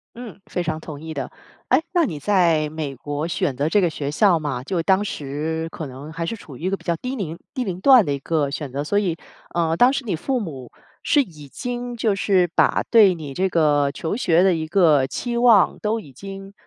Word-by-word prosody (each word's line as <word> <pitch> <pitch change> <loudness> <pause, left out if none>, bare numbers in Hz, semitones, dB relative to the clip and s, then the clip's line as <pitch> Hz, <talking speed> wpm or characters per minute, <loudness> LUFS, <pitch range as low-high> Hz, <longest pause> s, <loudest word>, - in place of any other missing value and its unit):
嗯， 230 -5 -9
非 180 - -3
常 160 -2 -2
同 150 -2 -9
意 160 0 -7
的。 135 -4 -5 0.4
哎， 260 +4 +4
那 345 -3 +3
你 155 - -5
在 165 -3 +2
美 150 -3 -5
国 145 +4 -4
选 145 -5 -1
择 145 +3 0
这 205 +5 +3
个 175 - +2
学 145 -2 -4
校 180 +1 +4
嘛， 145 -5 -3
就 170 +5 -1
当 190 +3 +3
时 160 -1 -3
可 155 - -6
能 135 +4 -9
还 165 0 -4
是 200 +7 -3
处 150 -10 -12
于 125 - -13
一 185 - 0
个 195 - -1
比 - - -20
较 170 - 0
低 255 +6 -4
龄 170 -8 -5 0.2
低 255 - -1
龄 185 -5 -5
段 255 -3 +7
的 145 - -1
一 140 - -3
个 145 -1 -1
选 145 -2 -5
择。 140 +2 -3
所 205 +7 +1
以 175 -5 -1 0.4
呃， 165 -1 +1
当 245 +9 +5
时 275 -1 -3
你 195 -6 -1
父 255 - -1
母 135 - -7 0.3
是 290 - +3
已 150 - -13
经 245 - -5
就 225 -3 +1
是 195 -2 +2
把 - - +3
对 210 -6 +6
你 150 -4 -7
这 190 +5 0
个 145 -4 +2
求 160 +6 -3
学 175 -7 +3
的 190 -1 +4
一 160 -1 -3
个 155 -6 +4
期 240 - -4
望 235 -6 +5
都 220 +2 -1
已 140 -10 -13
经 195 +5 -9
170 Hz, 250 characters per minute, -22 LUFS, 150-205 Hz, 0.4 s, 段